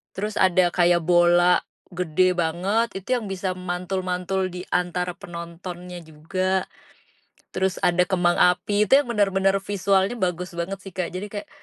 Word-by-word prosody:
Terus 210 +2 -3
ada 185 -1 +4
kayak 175 -1 +3
bola 175 0 +4 0.3
gede 180 +1 +1
banget 180 +7 0
itu 255 +7 -1
yang 215 - -7
bisa 185 0 -2
mantul-mantul 185 +1 -2
diantara 180 0 -2
penontonnya 175 +1 -8
juga, 185 +5 -2 0.9
terus 190 0 -1
ada 175 0 +3
kembang 175 -2 +1
api 205 +4 +3
itu 265 - +4
yang 240 - -8
bener-bener 195 -2 +2
visualnya 195 +2 +1
bagus 180 -1 -2
banget 180 +3 -4
sih 195 -2 -11
Kak 185 -3 -2
jadi 195 +3 -4
kayak, 205 -1 -7
185 Hz, 140 wpm, -23 LUFS, 175-195 Hz, 0.9 s, ada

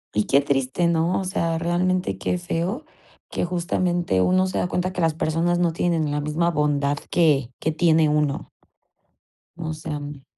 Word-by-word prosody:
Y 105 - +2
qué 140 - +4
triste, 140 +4 0
¿no? 170 +1 +1
O - - -2
sea, 165 -3 -1
realmente 175 - 0
qué 180 - -1
feo, 180 - -3 0.5
que - - -1
justamente, 175 - 0
uno 185 - +3
se 185 - -2
da - - 0
cuenta 180 +1 -2
que 180 - -3
las 160 -2 +2
personas 165 +2 0
no 175 -2 +1
tienen 165 -3 0
la 145 0 -1
misma 155 +3 0
bondad 145 -2 +1
que 145 -7 +2
que 160 - 0
tiene 160 -1 +3
uno. 150 -2 0 1.1
O 160 -2 -4
sea, 155 -1 -5
me 145 -1 -8
165 Hz, 175 wpm, -23 LUFS, 150-175 Hz, 1.1 s, qué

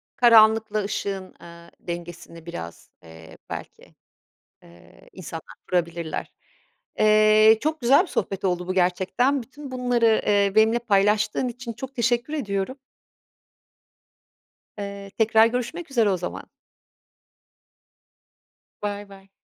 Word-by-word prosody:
Karanlıkla 220 -2 +5
ışığın, 195 -1 -4
eee, 170 0 -14
dengesini 170 -1 -8
biraz, 85 - -8
eee, 80 0 -14
belki, - - -9 0.7
eee, 85 0 -19
insanlar 165 -3 -9
kurabilirler. 170 -2 -2 0.7
Eee, 215 +1 +5
çok 310 +1 -2
güzel 265 +6 +5
bir - - -7
sohbet 195 - -3
oldu 180 -1 -1
bu 185 - -1
gerçekten. 190 +9 +1
Bütün 280 +4 -11
bunları, 245 -3 +1
eee, 200 -1 +3
benimle 220 +2 +4
paylaştığın 210 +2 +1
için 240 0 -7
çok 265 +4 -9
teşekkür 240 +3 0
ediyorum. 210 -2 -3 2.0
Eee, 200 -1 -7
tekrar 220 0 +5
görüşmek 250 +7 -4
üzere 230 -5 +3
o 190 - +1
zaman. 180 - -6 2.3
Baybay. 200 -1 -7
210 Hz, 105 wpm, -24 LUFS, 185-235 Hz, 2.3 s, Karanlıkla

